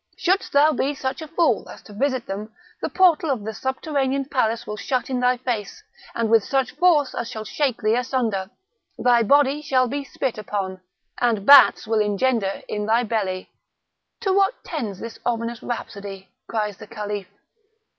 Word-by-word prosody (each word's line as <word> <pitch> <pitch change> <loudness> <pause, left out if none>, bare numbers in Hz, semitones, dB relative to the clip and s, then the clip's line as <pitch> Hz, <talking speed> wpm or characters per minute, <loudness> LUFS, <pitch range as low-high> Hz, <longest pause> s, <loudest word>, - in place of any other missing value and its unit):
Shouldst 375 +3 +1
thou 290 +2 +5
be 285 0 -1
such 260 +3 -4
a 315 - -6
fool 320 - +1
as - - -11
to 210 - -13
visit 260 +2 -1
them, 210 +3 -6 0.3
the - - -2
portal 345 -4 +3
of 250 -7 -1
the 220 +1 -4
subterranean 270 +1 -1
palace 235 -4 0
will 210 - -5
be - - -7
shut 255 0 -2
in 255 - 0
thy 250 0 +2
face, 245 - -4 0.3
and 230 -1 0
with 225 -1 +4
such 270 +2 0
force 300 -2 +3
as 235 - -4
shall 220 -3 -6
shake 270 0 -1
thee 215 +1 +3
asunder; 235 -6 -1 0.5
thy 240 -1 +4
body 285 +5 +3
shall 260 -4 +2
be 280 +3 -3
spit 265 -4 -3
upon, 195 -3 -4 0.4
and 225 -5 +1
bats 285 -3 +8
will 220 0 +1
engender 210 -1 0
in 210 0 -3
thy 230 +2 +3
belly." 200 -5 -2 0.7
"To 390 -4 +1
what 395 +4 +2
tends 230 - -4
this 230 0 -8
ominous 230 -1 -2
rhapsody?" 200 -5 -6 0.2
cries 210 -3 -2
the - - -11
Caliph. 205 -2 -5
240 Hz, 175 wpm, -23 LUFS, 215-275 Hz, 0.7 s, bats